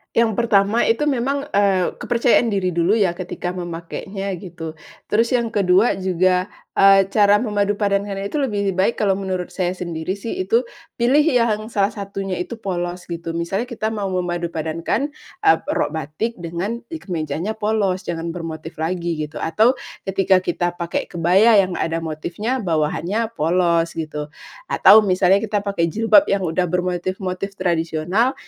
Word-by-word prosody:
Yang 230 -1 +3
pertama 215 0 +3
itu 230 +5 +2
memang, 275 0 0
eee, 195 -2 +2
kepercayaan 240 0 +2
diri 195 -4 0
dulu 170 +4 +2
ya 200 -5 +2
ketika 180 0 -5
memakainya, 180 +3 -5
gitu. 170 -3 -7 0.4
Terus 230 +4 +2
yang 235 -2 0
ke-2 195 +1 +3
juga, 185 0 +1 0.3
eee, 195 0 +7
cara 205 -1 +5
memadupadankan 205 -2 0
itu 200 +9 -2
lebih 205 -7 0
baik 190 +5 +1
kalau 195 -2 +1
menurut 185 -2 -3
saya 180 0 -1
sendiri 170 0 -4
sih 205 +3 -5
itu, 230 +5 +3 0.3
pilih 250 +5 +4
yang 230 -8 +1
salah 205 -2 +1
satunya 195 -3 -5
itu 180 +6 -4
polos, 180 -4 -4
gitu. 165 -1 -5
Misalnya 190 +8 -2
kita 220 -3 -3
mau 205 -3 -2
memadupadankan, 175 - -2 0.3
eee, 405 -1 +6 0.2
rok - - 0
batik 160 +9 -4
dengan 175 +7 -3
i 325 - -6
kemejanya 165 +1 -3
polos 210 -4 0
jangan 165 0 -3
bermotif 165 -2 -7
lagi 170 0 -2
gitu, 155 - -10
atau 220 +11 +3 0.3
ketika 195 -1 +3
kita 175 -1 -1
pakai 170 -1 -3
kebaya 190 +6 +5
yang 185 -2 -3
ada 165 0 -1
motifnya 170 +10 -3
bawahannya 170 +6 0
polos, 170 +1 +2
gitu. 150 -2 -5 0.4
Atau 215 +3 +7
misalnya 185 0 +4
kita 210 -1 0
pakai 200 -4 0
jilbab 225 - +5
yang 200 0 +1
udah 165 +3 0
bermotif-motif 180 +2 -2
tradisional, 175 +6 0
190 Hz, 150 wpm, -21 LUFS, 170-215 Hz, 0.4 s, eee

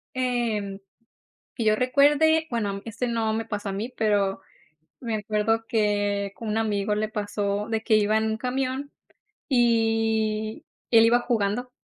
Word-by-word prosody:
Em, 230 -6 -1 0.8
que 235 - -2
yo 215 -1 +4
recuerde, 295 +6 +3
bueno, 205 -4 -2
este, 230 +2 -3
no 225 -2 0
me 225 +1 -2
pasó 205 -1 -4
a - - -2
mí, 215 +6 -4
pero 200 -3 +1 0.6
me 230 -3 -3
acuerdo 215 +2 0
que 205 -2 0
con 225 -2 -6
un 215 - 0
amigo 210 -2 0
le 215 +1 -1
pasó, 205 -1 -2
de 225 -1 -1
que 220 -1 +2
iba 215 +1 +3
en 220 - 0
un 220 0 -1
camión, 260 +3 -3 0.6
y 225 -3 +1 0.3
él 225 -1 +7
iba 240 +1 +4
jugando 240 0 -1
220 Hz, 150 wpm, -25 LUFS, 210-240 Hz, 0.8 s, él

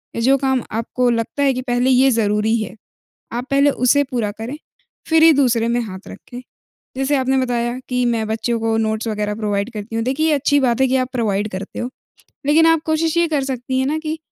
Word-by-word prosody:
या 230 - -2
जो 270 +4 +4
काम 265 -2 0
आपको 245 +3 -1
लगता 235 +4 -1
है 275 -1 +3
कि 255 - -3
पहले 245 +1 +1
ये 260 +1 +5
ज़रूरी 215 0 +1
है। 205 -1 -6 0.6
आप 240 +1 -3
पहले 280 +1 +4
उसे 275 +2 +3
पूरा 225 -4 -1
करें, 250 +6 -5 0.5
फिर 320 0 +4
ही 325 0 +8
दूसरे 245 -5 +2
में 235 +1 +1
हाथ 190 -4 -8
रखें। 245 0 -10 0.6
जैसे 270 +2 +1
आपने 265 0 +1
बताया, 245 -1 -1
कि 250 -1 0
मैं 230 -2 0
बच्चों 230 +2 -1
को 225 0 0
नोट्स 220 +1 -1
वगैरह 210 -1 -2
प्रोवाइड 205 +1 -2
करती 215 +1 -6
हूँ। 225 - 0
देखिए, 275 +5 0
ये 315 - +3
अच्छी 285 0 +2
बात 250 -2 +1
है 265 - +4
कि 260 - +1
आप 255 -1 -1
प्रोवाइड 210 -4 -1
करते 190 +2 -6
हो, 245 - -3 0.6
लेकिन 315 +3 +5
आप 325 -1 +4
कोशिश 320 +1 0
ये 340 0 +3
कर 300 -3 0
सकती 260 -1 -3
हैं 265 - 0
ना 305 +2 -1
कि, 315 0 -4
250 Hz, 220 wpm, -19 LUFS, 225-275 Hz, 0.6 s, ही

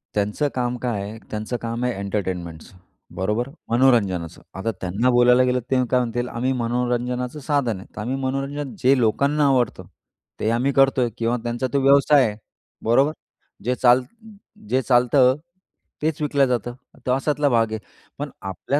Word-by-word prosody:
त्यांचं 105 +8 0
काम 125 -1 -1
काय 120 -4 -2
आहे, 105 +3 -7
त्यांचं 110 +3 -3
काम 115 +1 -3
आहे 125 - 0
एंटरटेनमेंटचं, 95 -4 -4 0.4
बरोबर 105 +7 -1 0.2
मनोरंजनाचं. 105 -9 +2 0.2
आता 115 +4 -1
त्यांना 100 +7 0
बोलायला 125 +1 +5
गेलं, 125 0 +1
ते - - +4 0.2
काय 125 - +4
म्हणतील, 120 0 -2
“आम्ही 125 +3 -1
मनोरंजनाचं 125 +2 -1
साधन 140 -6 0
आहे, 95 - -11
तर - - -5
आम्ही 125 +5 -2
मनोरंजन 135 +1 -3
जे 135 +2 +4
लोकांना 140 +6 +2
आवडतं, 125 -8 +1 0.6
ते 110 - 0
आम्ही 125 +4 +1
करतोय.” 135 -3 +3
किंवा 120 +1 0
त्यांचा 120 +2 -2
तो 140 - +3
व्यवसाय 140 0 +5
आहे, 105 - -4 0.5
बरोबर. 135 +6 +3 0.5
जे 125 +3 0
चाल 125 0 +5 0.7
जे 130 - +2
चालतं 125 +1 +4 0.7
तेच 155 +1 -1
विकलं 140 -2 +2
जातं, 120 -1 -2 0.3
तो 125 - +1
अशातला 145 +2 +1
भाग 115 -2 +2
आहे. 110 - -3 0.4
पण - - -4 0.2
आपल्या 135 +9 -1
125 Hz, 155 wpm, -22 LUFS, 115-135 Hz, 0.7 s, बोलायला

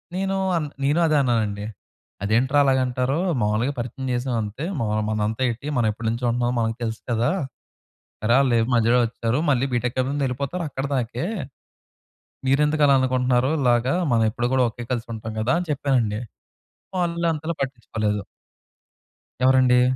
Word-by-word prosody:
నేను 195 +1 -1 0.2
అన్ 150 -3 -2 0.2
నేను 150 +4 +2
అదే 155 - +2
అన్నానండి. 110 -5 0 0.6
అదేంట్రా 130 +7 +2
అలాగంటారు? 130 0 +1 0.2
మావూలుగా 110 +6 +1
పరిచయం 125 +3 -5
చేసామంతే. 120 -1 -2 0.2
మా 115 - 0 0.2
మనదంతా 110 +2 -1
ఏంటి? 120 +5 -5
మనవెప్పటి 110 -1 0
నుంచో 120 +2 -2
ఉంటున్నాం. 120 +1 0
మనకు 115 0 0
తెలుసు 110 -1 -3
కదా! 115 +5 +2 0.9
సరే, 115 +2 +3
ఆళ్ళేం 120 -4 +3
మధ్యలో 120 +1 +4
వచ్చారు. 115 +2 -2
మళ్ళీ 135 -1 +2
బీటెక్ 120 +1 -1
అయి 130 - 0
ముందే 145 -1 -1
యెళ్ళిపోతారు 140 +8 -3
అక్కడిదాకే. 135 +1 -2 1.2
మీరెందుకు 150 +2 +3
అలా 140 - +5
అనుకుంటున్నారు? 130 0 +2
ఇలాగా, 125 +3 +2 0.2
మనయెప్పుడు 115 +2 +1
కూడా 130 -1 +4
ఒకే 120 +2 -8
కలిసుంటాం 115 -2 -4
కదా! 120 +4 +1
అని 180 - -4
చెప్పానండి. 125 -6 0 0.8
వాళ్ళు 170 -1 0
అంతలా 160 +2 -3
పట్టించుకోలేదు. 110 -5 -2 1.2
ఎవరండి? 130 -1 +5
125 Hz, 130 wpm, -23 LUFS, 115-135 Hz, 1.2 s, అలా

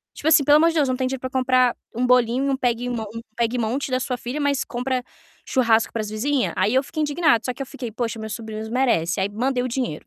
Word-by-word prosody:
Tipo 305 - -2
assim, 315 -2 +6
pelo 290 +2 +6
amor 330 +2 +5
de 330 - -1
Deus, 290 -4 +3
não 255 - 0
tem 260 0 -1
dinheiro 265 -1 -4
para 255 - -4
comprar 255 -1 +2 0.2
um 245 +2 0
bolinho 250 +1 +3
e - - +1
um 270 - +1
peguemon 245 -2 -1
um 230 - -5 0.2
pegue 235 +1 0
e - - -2
monte 245 +5 -1
da 255 - +1
sua 255 0 -2
filha, 245 +5 -5
mas 280 -2 +1
compra 250 +1 -2 0.4
churrasco 230 -3 +2
para 225 - -2
as 215 - -5
vizinha? 250 +6 0
Aí 195 +4 +2
eu 265 - +4
fico 310 +3 -5
indignada, 295 -5 +2
só 250 - -1
que 245 - -18
eu 275 - -3
fiquei: 255 -3 -7
"Poxa, 230 0 -3
meus 220 0 -5
sobrinhos 220 -1 -6
merecem". 220 -8 +1
Aí 195 - +1
mandei 245 +5 -1
o - - -2
dinheiro. 240 - -3
250 Hz, 270 wpm, -23 LUFS, 230-270 Hz, 0.4 s, assim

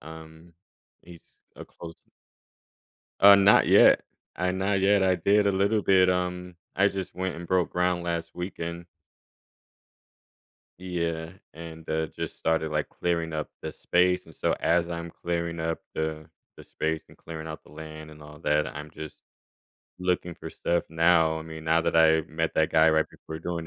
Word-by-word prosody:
um, 80 +2 -12 0.5
he's 85 -1 -16 0.2
a - - -9
close 85 -1 -12 1.2
Uh, 100 0 +10
not 100 0 +5
yet. - - +7 0.3
I 90 +1 -1
not 95 +1 0
yet. 100 0 +4
I 95 -1 +3
did 100 +4 +3
a 100 - +3
little 100 +3 +1
bit. 95 -1 +4
Um, 90 0 -2 0.2
I 100 +1 +4
just 95 -2 -6
went 95 -1 -3
and 85 - -8
broke 90 0 +1
ground 90 0 0
last 85 -1 -4
weekend. 85 -1 -6 1.9
Yeah, 85 -2 -3 0.2
and, 80 0 -10
uh, 80 0 0
just - - -7
started, 80 -1 0
like, 75 -1 -1
clearing 85 -2 -2
up 75 -1 -4
the - - -5
space, 90 +1 +1
and 80 - -15
so - - 0
as 85 0 +2
I'm 85 -1 -5
clearing 85 -1 -3
up 80 0 -2
the 80 -1 -4 0.3
the - - -13
space 80 0 -3
and - - -18
clearing 80 -1 -8
out 80 0 -7
the - - -19
land, 80 0 -9
and 75 0 -14
all 75 0 -12
that, 75 -1 +1
I'm 75 +1 -8
just 80 -1 -10 0.8
looking 90 -1 -1
for - - -9
stuff 85 0 -1
now. 80 -1 +3
I 80 - -7
mean, 80 0 -9
now 80 +1 +3
that 85 - 0
I 80 0 +5
met 80 +2 -3
that 80 -1 +2
guy 80 0 +5
right 80 0 +2
before 80 - -9
doing 85 -1 -4
85 Hz, 170 wpm, -26 LUFS, 80-90 Hz, 1.9 s, Uh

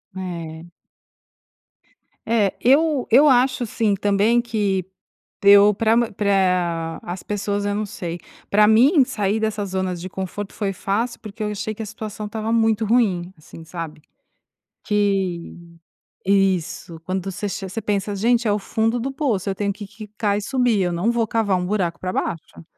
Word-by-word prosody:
É. 170 -3 -6 1.6
É, 220 -4 +2
eu 285 +1 +3
eu 275 +6 +6
acho 255 -1 +3
sim 215 -2 0
também 205 +4 +2
que 205 -6 -1 0.6
eu 200 +1 +7
pra 225 +2 +2 0.2
pra 180 -5 0
as 175 +1 -6
pessoas, 205 0 -2
eu 205 0 0
não 210 0 -1
sei, 175 -3 -6 0.3
pra 210 +1 +5
mim, 260 - +6
sair 210 -3 -1
dessa 215 -2 -1
zona 185 -1 -2
de 175 +2 -7
conforto 190 +2 -5
foi 200 -2 -2
fácil, 225 +6 -2
porque 215 0 -7
eu 210 - -1
achei 210 +1 -4
que 220 - -8
a - - -5
situação 215 0 -7
estava 220 +1 -3
muito 225 -1 +2
ruim, 190 -6 +1
assim, 160 +1 -13
sabe. 165 -2 -7 0.8
Que 190 -5 -1 0.6
isso. 190 -4 0
Quando 185 +2 -3
você 195 +2 -4
che 190 0 -5
você 210 +5 -4
pensa: 205 -1 -1
"Gente, 235 +2 +2
é - - +3
o 205 - +1
fundo 225 +4 0
do 270 +3 -3
poço, 245 - -1
eu - - -2
tenho 200 0 -1
que 205 0 -9
quicar 210 0 -3
e - - -4
subir, 245 -3 +1
eu 175 - 0
não 175 +7 +1
vou 230 -1 +1
cavar 210 -3 +1
um 180 0 -2
buraco 180 -4 -1
pra 185 0 -3
baixo". 165 0 -4
205 Hz, 165 wpm, -22 LUFS, 185-220 Hz, 1.6 s, eu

